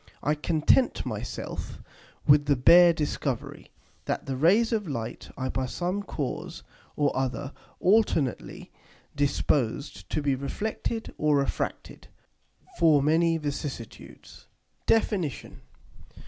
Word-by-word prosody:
I 150 Hz, -, +2 dB
content 160 Hz, -, +2 dB
my -, -, -3 dB
self -, -, -6 dB, 0.5 s
with 145 Hz, 0 st, +5 dB
the 145 Hz, -, +4 dB
bare 170 Hz, +7 st, +7 dB
Discovery, 145 Hz, -5 st, -3 dB, 0.4 s
that -, -, -2 dB
the 135 Hz, -, -3 dB
Rays 200 Hz, -, +3 dB
of 210 Hz, -4 st, -1 dB
Light 115 Hz, -6 st, -5 dB
are 130 Hz, -1 st, -2 dB
by 130 Hz, -1 st, -2 dB
some 180 Hz, +8 st, -2 dB
cause 150 Hz, -9 st, -5 dB, 0.3 s
or 145 Hz, -1 st, +1 dB
other 135 Hz, +2 st, -2 dB, 0.3 s
alternately 185 Hz, -, +1 dB, 0.4 s
disposed 140 Hz, -1 st, -1 dB
to 155 Hz, -, -2 dB
be 140 Hz, -1 st, +2 dB
reflected 215 Hz, -, -4 dB
or 150 Hz, -1 st, +3 dB
refracted 140 Hz, -, -3 dB, 0.7 s
for 155 Hz, -4 st, +5 dB
many 165 Hz, +2 st, +3 dB
vicissitudes. 145 Hz, -6 st, -7 dB, 0.4 s
DEFINITION. 195 Hz, -, 0 dB
150 Hz, 110 wpm, -27 LUFS, 140-175 Hz, 0.7 s, bare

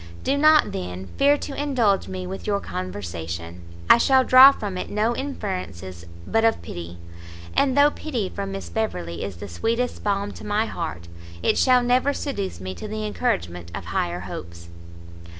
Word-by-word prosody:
Do 275 Hz, -, +1 dB
not, 305 Hz, +1 st, +5 dB
then, 90 Hz, +1 st, -6 dB
fear 285 Hz, +1 st, +5 dB
to 285 Hz, -, -6 dB
indulge 255 Hz, -9 st, +1 dB
me 185 Hz, -1 st, -5 dB
with 190 Hz, +1 st, -7 dB
your 200 Hz, -1 st, +1 dB
conversation; 85 Hz, -, -6 dB, 0.3 s
I -, -, +8 dB
shall 265 Hz, +1 st, +4 dB
draw 260 Hz, +2 st, +9 dB
from 205 Hz, -8 st, -5 dB
it 180 Hz, -, -4 dB
no 220 Hz, +3 st, 0 dB
inference 190 Hz, -, -4 dB, 0.4 s
but 225 Hz, -, +1 dB
of 225 Hz, 0 st, +3 dB
pity, 85 Hz, 0 st, -7 dB, 0.6 s
and 270 Hz, -1 st, +2 dB
though 290 Hz, +1 st, +6 dB
pity 250 Hz, -12 st, -3 dB
from 195 Hz, +1 st, -5 dB
Miss 195 Hz, 0 st, -6 dB
Beverley 85 Hz, -, -3 dB
is 100 Hz, -2 st, -5 dB
the 100 Hz, +4 st, -8 dB
sweetest 230 Hz, -, -2 dB
balm 200 Hz, 0 st, 0 dB
to -, -, -11 dB
my 210 Hz, +1 st, 0 dB
heart, 85 Hz, -, -5 dB, 0.4 s
it -, -, +3 dB
shall 250 Hz, -1 st, +4 dB
never 250 Hz, +3 st, +2 dB
seduce 200 Hz, -, -4 dB
me 95 Hz, 0 st, -5 dB
to 215 Hz, -, -7 dB
the 215 Hz, 0 st, -4 dB
encouragement 90 Hz, -, -2 dB
of -, -, -6 dB
higher 85 Hz, +1 st, -2 dB
hopes." 85 Hz, -2 st, -8 dB
200 Hz, 170 wpm, -24 LUFS, -, 0.6 s, draw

